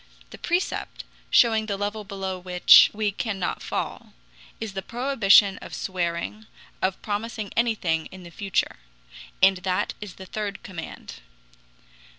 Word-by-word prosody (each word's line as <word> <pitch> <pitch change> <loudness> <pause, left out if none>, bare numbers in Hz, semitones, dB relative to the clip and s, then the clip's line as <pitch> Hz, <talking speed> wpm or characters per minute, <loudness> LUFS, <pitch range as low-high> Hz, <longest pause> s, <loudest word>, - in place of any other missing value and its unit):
The - - -11
precept, 350 +2 -2 0.3
showing 220 -2 +4
the 200 -2 -2
level 205 +1 -3
below 195 -2 -5
which 180 0 +7
we 210 -1 -1
cannot 200 -2 -3
fall, - - -4 0.5
is 220 -3 -5
the 195 - -3
prohibition 210 -5 +4
of - - -9
swearing, 180 +4 -3 0.3
of 190 0 0
promising 215 0 -4
anything 195 -9 0
in 185 -1 -12
the 170 - -11
future. 195 +2 -1 0.7
And 190 0 +6
that 180 0 -1
is 205 -4 -8
the 190 - -10
third 205 +1 -5
command. 170 - -8
200 Hz, 135 wpm, -25 LUFS, 185-215 Hz, 0.7 s, which